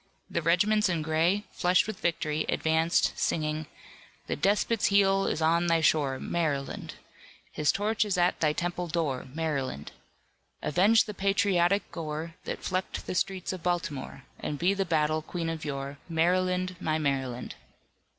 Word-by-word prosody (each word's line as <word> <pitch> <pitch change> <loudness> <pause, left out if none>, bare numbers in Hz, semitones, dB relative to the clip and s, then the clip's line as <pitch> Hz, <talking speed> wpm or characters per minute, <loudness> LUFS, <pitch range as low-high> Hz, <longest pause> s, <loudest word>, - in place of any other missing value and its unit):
The 170 - 0
regiments 200 +6 +3
in 165 -3 0
gray, 165 +6 +2
flushed 180 0 +3
with 220 -3 -6
victory, 155 -2 0
advanced 160 +1 +2
singing: 155 -1 -1 0.6
"The - - -2
despot's 205 +5 +2
heel 195 -1 +3
is 160 - -1
on 170 +2 +3
thy 165 -1 +3
shore, 145 -4 +2
Maryland! 150 -5 -2 0.6
His 150 - +2
torch 210 +2 +1
is 200 -3 -1
at 175 0 +2
thy 155 -2 +3
temple 175 +2 -2
door, 155 -7 -2
Maryland! 140 - -3 0.7
Avenge 200 +8 +4
the 210 - -7
patriotic 195 -1 +2
gore 160 0 -5
That - - -5
flecked 185 +1 -3
the - - -3
streets 190 0 -1
of 185 - -7
Baltimore 170 -6 -3 0.2
And 150 - -3
be 175 +6 +2
the 195 -1 -1
battle 155 -2 +1
queen 165 +1 -4
of 165 -1 -4
yore, 140 -1 -5
Maryland, 180 +2 +1
my 155 -4 0
Maryland!" 135 -5 -2
170 Hz, 150 wpm, -28 LUFS, 155-185 Hz, 0.7 s, Avenge